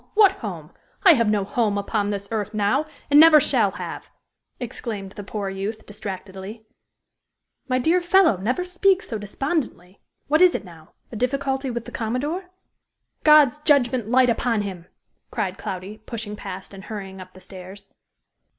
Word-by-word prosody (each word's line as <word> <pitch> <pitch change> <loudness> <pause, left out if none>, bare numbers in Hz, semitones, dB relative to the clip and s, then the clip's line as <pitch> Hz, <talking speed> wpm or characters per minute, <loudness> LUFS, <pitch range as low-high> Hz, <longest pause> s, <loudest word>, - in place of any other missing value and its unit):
What 415 -2 +7
home? - - -7 0.3
I 365 -4 +9
have 230 -6 +2
no 210 -2 +1
home 215 -2 0
upon 205 0 -1
this 200 -1 -4
earth 215 0 -3
now, 210 +9 +1 0.2
and 290 - +8
never 315 -1 +9
shall 245 -7 +2
have!" 180 -4 -7 0.5
exclaimed 220 -5 -5
the 205 - -8
poor 205 0 -4
youth, 195 +3 -5
distractedly. 200 +1 -8 1.0
"My 255 -1 +1
dear 330 +8 +2
fellow, 350 - +4
never 245 - -1
speak 370 +2 +2
so 225 - -5
despondently. 205 - -4 0.3
What 310 +3 +3
is 365 -1 +6
it - - -4
now? 165 -3 -15 0.2
a - - -7
difficulty 270 +3 -1
with 235 -1 -4
the - - -9
commodore?" 280 - -3 0.8
"God's 300 -3 +6
judgment 255 -6 +2
light 250 0 +4
upon 230 -2 0
him!" 185 -4 -7 0.4
cried 195 -5 -3
Cloudy, 190 +3 -6
pushing 215 -1 -6
past 190 -1 -8
and 195 0 -10
hurrying 195 -3 -7
up 185 0 -13
the - - -12
stairs. 190 +1 -11
220 Hz, 160 wpm, -23 LUFS, 195-275 Hz, 1.0 s, I